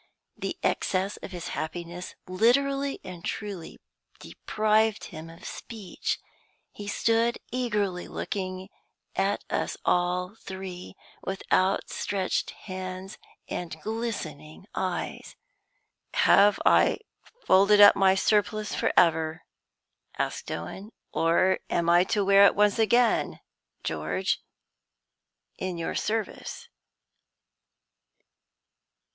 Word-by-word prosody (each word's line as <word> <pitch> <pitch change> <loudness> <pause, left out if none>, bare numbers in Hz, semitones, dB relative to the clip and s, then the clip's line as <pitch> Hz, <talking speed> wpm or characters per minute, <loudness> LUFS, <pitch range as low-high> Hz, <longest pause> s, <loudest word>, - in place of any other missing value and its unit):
The - - -4
excess 190 +2 0
of - - -8
his 175 -2 -6
happiness 175 +2 -5
literally 275 +8 +2
and 180 -2 -9
truly 200 -6 -5 0.4
deprived 215 0 +1
him 160 +1 -8
of 165 +2 -13
speech. 215 -5 -4 0.5
He 205 - -9
stood 230 +3 +2
eagerly 210 -7 -1
looking 185 -1 -4 0.5
at 195 +1 0
us - - -1
all 180 +1 +1
three, 190 -3 -8 0.3
with 190 0 -4
outstretched 190 0 0 0.2
hands 185 0 -6 0.3
and 165 -2 -5
glistening 200 -9 -5
eyes. 185 -2 -3 0.8
"Have 200 +1 +5
I - - +5 0.5
folded 200 +2 +6
up 205 0 +10
my 190 -1 +4
surplice 210 +1 +1
forever," 160 -2 +2 0.7
asked - - -2
Owen, 190 - -6 0.2
"or 170 +3 +3
am 170 0 +2
I 175 +1 +5
to 205 -1 0
wear 200 0 +7
it - - +2
once 210 +2 +3
again, 235 +1 +3 0.4
George, 80 +4 -1 1.2
in 185 -2 -3
your 165 - -3
service?" 220 -1 -3
190 Hz, 95 wpm, -27 LUFS, 175-210 Hz, 1.2 s, up